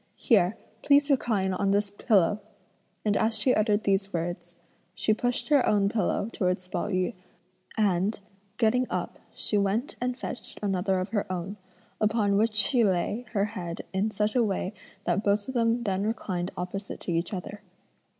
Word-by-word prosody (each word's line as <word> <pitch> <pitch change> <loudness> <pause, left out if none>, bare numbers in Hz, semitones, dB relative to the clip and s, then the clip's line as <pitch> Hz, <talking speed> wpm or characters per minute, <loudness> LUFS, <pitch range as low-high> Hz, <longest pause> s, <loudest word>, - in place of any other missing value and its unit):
here, 210 -2 +3 0.2
please 285 0 +4
recline 210 -8 +1
on 195 +2 0
this 200 0 +1
pillow!" 205 -1 +2 0.6
and 210 -1 +2
as 220 +1 +2
she 250 +4 +3
uttered 210 -1 +2
these 195 0 +1
words, 175 0 -4 0.4
she 215 - +2
pushed 245 +6 -1
her 285 -4 +5
own 200 -1 +3
pillow 205 -1 0
towards 180 -2 -1
Pao - - -2
yü, 185 -2 0 0.6
and, 200 0 +1 0.4
getting 250 +2 +2
up - - -3 0.2
she 210 - 0
went 215 - 0
and 250 0 -1
fetched 250 - -7
another 190 -1 +1
of 185 +2 -3
her 205 -2 -2
own, 185 +2 -3 0.5
upon 210 -2 +2
which 215 +1 +2
she 235 +3 +3
lay 205 +5 0
her 200 -2 +2
head 180 -6 -5
in 195 +3 +1
such 210 +1 -1
a 250 - +4
way 195 -1 -1 0.3
that 180 +4 0
both 205 0 +1
of 260 - -4
them 235 0 +2
then 195 -3 0
reclined 185 -5 -2
opposite 195 +3 -5
to - - -3
each 170 +1 -1
other. 200 +1 -6
205 Hz, 170 wpm, -27 LUFS, 185-225 Hz, 0.6 s, her